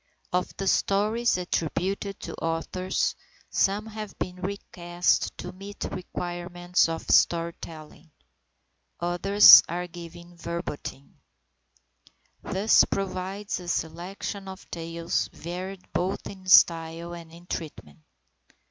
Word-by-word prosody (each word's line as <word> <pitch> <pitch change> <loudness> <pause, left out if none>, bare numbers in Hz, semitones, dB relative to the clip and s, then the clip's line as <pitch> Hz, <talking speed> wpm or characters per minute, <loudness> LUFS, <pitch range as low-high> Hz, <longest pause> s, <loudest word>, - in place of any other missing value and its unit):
Of 180 0 -1
the 195 - -3
stories 210 +4 +2
attributed 185 +3 -2
to - - -6
authors, 165 +3 -1 0.4
some 200 +2 +1
have 215 -2 -8
been 180 0 -4
recast 180 -2 -1
to 180 - -6
meet 195 +2 -10
the - - -3
requirements 175 -1 -1
of 165 - -4
storytelling; 165 -2 0 0.9
others 175 +4 +8
are 175 +1 -2
given 175 0 -11
verbatim. 170 -5 -6 1.2
This 200 +4 +4
provides 195 +2 -3
a 180 - -10
selection 185 +4 -4
of 190 0 -9
tales 165 0 -2
varied 180 +3 -6
both 185 +3 -1
in 190 -2 -9
style 165 -1 +4
and 170 -1 -10
in 170 +1 -14
treatment. 150 - -7
180 Hz, 105 wpm, -26 LUFS, 170-195 Hz, 1.2 s, others